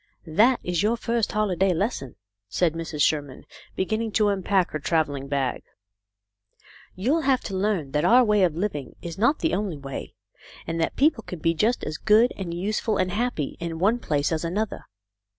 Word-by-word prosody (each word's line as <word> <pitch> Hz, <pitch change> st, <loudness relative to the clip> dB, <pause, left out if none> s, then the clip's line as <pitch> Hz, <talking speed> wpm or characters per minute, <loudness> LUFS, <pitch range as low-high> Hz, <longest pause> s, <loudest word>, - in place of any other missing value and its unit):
"That 220 Hz, +11 st, +3 dB
is 175 Hz, -1 st, 0 dB
your 220 Hz, +3 st, +1 dB
first 230 Hz, -1 st, -1 dB
holiday 195 Hz, -3 st, +1 dB
lesson," 165 Hz, -, -2 dB, 0.3 s
said 165 Hz, -, +1 dB
Mrs. 165 Hz, -3 st, -2 dB
Sherman, 145 Hz, -4 st, -1 dB, 0.3 s
beginning 220 Hz, +3 st, -1 dB
to 210 Hz, -1 st, +3 dB
unpack 190 Hz, -2 st, +1 dB
her 155 Hz, -, -3 dB
travelling 145 Hz, -3 st, 0 dB
bag. 135 Hz, -2 st, -1 dB, 0.7 s
" 100 Hz, 0 st, -26 dB
You'll 265 Hz, -, +1 dB
have 270 Hz, -3 st, +2 dB
to 195 Hz, -, -5 dB
learn 190 Hz, -8 st, -1 dB
that 150 Hz, +1 st, 0 dB
our 250 Hz, +2 st, +6 dB
way 210 Hz, -3 st, +3 dB
of 175 Hz, -4 st, +2 dB
living 165 Hz, -8 st, -3 dB
is 170 Hz, +2 st, -6 dB
not 240 Hz, +8 st, +2 dB
the 325 Hz, -, +1 dB
only 195 Hz, -6 st, -1 dB
way, 135 Hz, -1 st, -7 dB, 0.5 s
and 165 Hz, 0 st, -2 dB
that 165 Hz, -, -1 dB
people 285 Hz, -4 st, +3 dB
can 180 Hz, -, -7 dB
be 165 Hz, +1 st, +1 dB
just 220 Hz, +9 st, +1 dB
as 155 Hz, 0 st, -4 dB
good 220 Hz, +3 st, +4 dB
and 185 Hz, -3 st, -5 dB
useful 205 Hz, +5 st, -1 dB
and 185 Hz, -1 st, 0 dB
happy 210 Hz, -, -2 dB
in 170 Hz, -1 st, -4 dB
one 210 Hz, +8 st, +2 dB
place 145 Hz, -7 st, 0 dB
as 160 Hz, 0 st, -1 dB
another. 200 Hz, +6 st, -3 dB
185 Hz, 185 wpm, -25 LUFS, 155-215 Hz, 0.7 s, our